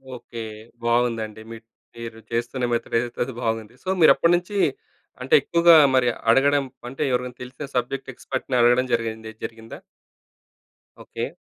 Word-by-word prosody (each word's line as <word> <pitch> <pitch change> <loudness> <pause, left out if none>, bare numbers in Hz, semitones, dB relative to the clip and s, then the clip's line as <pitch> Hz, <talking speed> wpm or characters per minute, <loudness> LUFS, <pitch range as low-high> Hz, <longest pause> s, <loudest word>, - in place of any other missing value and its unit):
Okay. 120 -1 -9 0.4
బావుందండి. 115 -2 0
Mid 115 0 -10 0.3
తీరు 115 -1 -8
చేస్తున్న 120 +2 -1
మెథడేదైతే 115 0 -2
అది 130 - -7
బాగుంది. 115 0 -3
సో, - - -16
మీరప్పటినుంచి 175 +4 +4 0.6
అంటే, - - -3
ఎక్కువగా 170 0 +5 0.2
మరి 125 -1 +3 0.2
అడగడం 140 +4 +4 0.2
అంటే, 135 +4 -7
ఎవరికైన 125 0 -2
తెలిసిన 130 +3 -8
సబ్జెక్ట్ 125 +2 -2
ఎక్స్పర్ట్‌ని 130 +1 -4
అడగడం 120 +2 +4
జరిగింది 110 -1 -2
జరిగిందా? 115 -1 -8 1.3
ఓకే. - - -6
120 Hz, 120 wpm, -23 LUFS, 115-135 Hz, 1.3 s, ఎక్కువగా